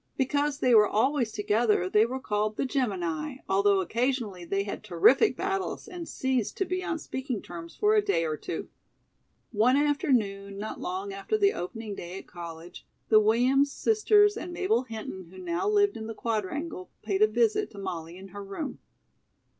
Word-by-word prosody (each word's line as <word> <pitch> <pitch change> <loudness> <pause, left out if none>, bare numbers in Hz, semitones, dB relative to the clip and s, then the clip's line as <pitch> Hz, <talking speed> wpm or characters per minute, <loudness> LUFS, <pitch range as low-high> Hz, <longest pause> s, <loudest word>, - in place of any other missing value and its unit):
Because 285 +2 +1
they 250 - +4
were 210 -2 +7
always 245 +1 +1
together 210 -2 +1
they 210 +4 +4
were 260 +2 -4
called 215 -3 -1
"the - - 0
Gemini," 225 - -2
although 195 0 +3
occasionally 230 -2 -1
they 195 +3 -1
had 200 - -6
terrific 215 - +4
battles 385 0 -2
and 350 -3 -7
ceased 260 -5 -1
to 385 - +1
be 370 +1 -2
on 360 -3 -2
speaking 260 -6 -4
terms 170 -2 -9
for 420 0 +3
a 425 - +5
day 400 - +1
or 155 -1 -1
two. - - -6 0.8
One 240 +4 +3
afternoon, 220 -9 0
not 215 +2 -5
long 190 +2 -4
after 195 - -1
the 405 -1 +3
opening 215 +4 -5
day 180 -1 -7
at - - -9
college, 170 0 -10 0.2
the 215 - +7
Williams 250 +6 +3
sisters 415 0 +3
and 355 - -6
Mabel 375 +5 +1
Hinton, 220 -5 -7
who 190 - -14
now 180 - -1
lived 405 -1 +3
in 220 0 -6
the 225 - -6
Quadrangle, 225 - -3
paid 200 -2 -1
a 215 - +7
visit 225 0 +1
to 205 - -15
Molly 175 -3 -5
in 195 +1 -11
her 200 +2 -8
room. 200 +10 -5
220 Hz, 180 wpm, -28 LUFS, 195-285 Hz, 0.8 s, were